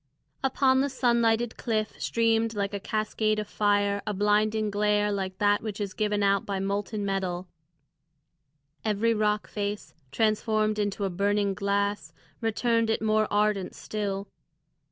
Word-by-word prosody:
Upon 265 0 +3
the 280 - 0
sun 245 -3 +2
lighted 225 0 +1
cliff 215 -3 -1
streamed 225 -1 +1
like 200 0 -2
a 200 - -2
cascade 215 +1 -1
of 210 -1 -3
fire 205 -1 +1
a 210 - -1
blinding 210 +1 +2
glare 210 0 +2
like 190 -2 -3
that 205 0 +3
which 215 -2 -5
is 200 -2 -3
given 210 -1 0
out 200 0 +3
by 200 -1 -3
molten 200 +2 -2
metal; 185 -2 -2 1.4
every 220 +2 +1
rock 210 -1 0
face, 205 0 -4 0.2
transformed 215 +2 +1
into 205 0 -1
a 190 - -2
burning 200 +2 +1
glass, 200 +1 -1 0.3
returned 230 0 +1
it 220 - 0
more 215 0 +2
ardent 205 -2 +1
still. 200 -2 -4
210 Hz, 145 wpm, -27 LUFS, 200-220 Hz, 1.4 s, Upon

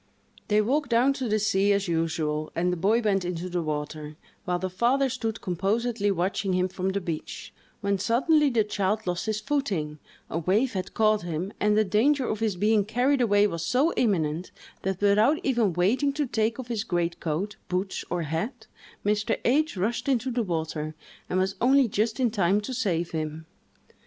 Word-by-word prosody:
They 210 0 +3
walked 270 +5 0
down 245 +4 +4
to 260 -2 -3
the 215 - +2
sea, 205 -1 +2
as 200 -1 0
usual, 160 -2 -1
and 180 +2 +1
the - - -3
boy 210 +7 +2
went 200 -4 +1
into 180 0 -4
the 175 -1 -1
water, 150 0 -4 0.3
while 180 -2 0
the 185 +1 -2
father 245 +9 +1
stood 225 -3 -3
composedly 205 +4 0
watching 190 +1 0
him 185 0 +1
from 185 +1 -2
the 195 +1 -1
beach, 170 -4 -6 0.3
when 200 -1 0
suddenly 285 - +3
the 235 -4 +2
child 210 +1 -1
lost 180 +3 -2
his 215 -1 0
footing, 195 - -2 0.3
a 165 - -2
wave 210 +10 +1
had 185 -2 -4
caught 215 -1 +3
him, 175 +3 -4
and 210 0 +2
the 215 - +5
danger 250 +8 +2
of 215 - -2
his 220 -4 0
being 210 +3 +3
carried 250 +6 +1
away 205 -3 +4
was 170 -5 -2
so 260 - +2
imminent, 175 -6 0 0.3
that, 190 0 -3
without 210 +9 +4
even 235 -7 +2
waiting 210 - +2
to 295 +1 -1
take 225 -2 0
off 250 -2 -7
his 225 -3 -1
greatcoat, 175 +1 -2
boots, 185 +2 -2
or 175 -1 -1
hat, 215 - -4 0.4
Mr. 210 +2 +1
H—— 300 0 +2
rushed 230 +8 -1
into 255 -1 +1
the 240 0 0
water, 160 -5 -3 0.3
and 180 - 0
was 190 +1 +1
only 265 +1 +5
just 220 +3 -1
in 245 -3 +2
time 200 -2 +2
to 235 +5 -5
save 175 -9 -1
him. 155 0 -4
205 Hz, 185 wpm, -26 LUFS, 175-235 Hz, 0.4 s, the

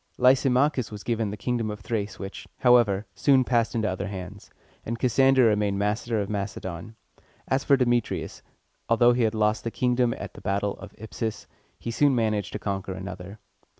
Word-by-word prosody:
Lysimachus 130 0 +3
was 105 -1 -8
given 115 -3 -1
the 105 - -6
kingdom 115 +1 -1
of 105 0 -6
Thrace, 105 -1 -3
which, 95 +1 -8
however, 115 -5 +4
soon 130 +7 +4
passed 120 -2 +1
into 110 -2 0
other 95 +1 -3
hands; 100 +1 -8 0.3
and 115 +1 -4
Cassander 130 +1 +4
remained 105 -2 +2
master 105 +3 -1
of 100 - -2
Macedon. 100 0 -5 0.5
As 135 +1 +1
for 140 - +4
Demetrius, 120 -2 -1 0.5
although 120 +1 +5
he 125 - 0
had 110 0 -1
lost 105 0 +1
a - - +1
kingdom 125 0 +1
at - - -7
the - - -12
battle 100 +1 -1
of 95 +1 -11
Ipsus, 110 0 -5 0.3
he 115 - -5
soon 135 +4 +3
managed 110 -3 0
to - - -2
conquer 100 -2 -3
another. 95 +1 -8
110 Hz, 175 wpm, -26 LUFS, 100-120 Hz, 0.5 s, although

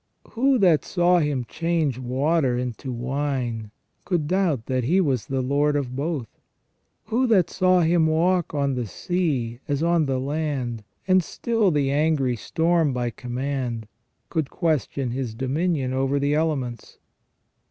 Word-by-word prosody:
Who 265 +3 +3
that 180 -8 +4
saw 175 0 +3
Him 145 -5 -1
change 165 -6 -1
water 130 +1 +1
into 125 +1 -4
wine 125 -3 -2 0.3
could 175 -4 0
doubt 170 - +1
that 130 -1 -1
He 170 +11 +2
was 135 - 0
Lord 140 +3 +1
of 130 -3 -2
both? 140 -5 -4 0.6
Who 255 +3 +1
that 195 -7 +3
saw 185 -1 +3
Him 165 -1 +3
walk 170 +2 +2
on 140 -2 0
the 125 -3 -2
sea 135 - -2
as 145 0 -1
on 170 -3 +2
the 130 -1 0
land, 135 -5 -2 0.2
and 185 -1 +4
still 225 +2 0
the 145 -4 +1
angry 145 -4 +1
storm 160 +4 +1
by 120 -1 -1
command, 125 -2 -4 0.4
could 160 -5 -1
question 145 -5 -1
His 125 -3 -3
dominion 135 +1 -1
over 135 +1 +1
the 140 +1 +1
elements? 140 -7 -2
145 Hz, 140 wpm, -24 LUFS, 130-170 Hz, 0.6 s, that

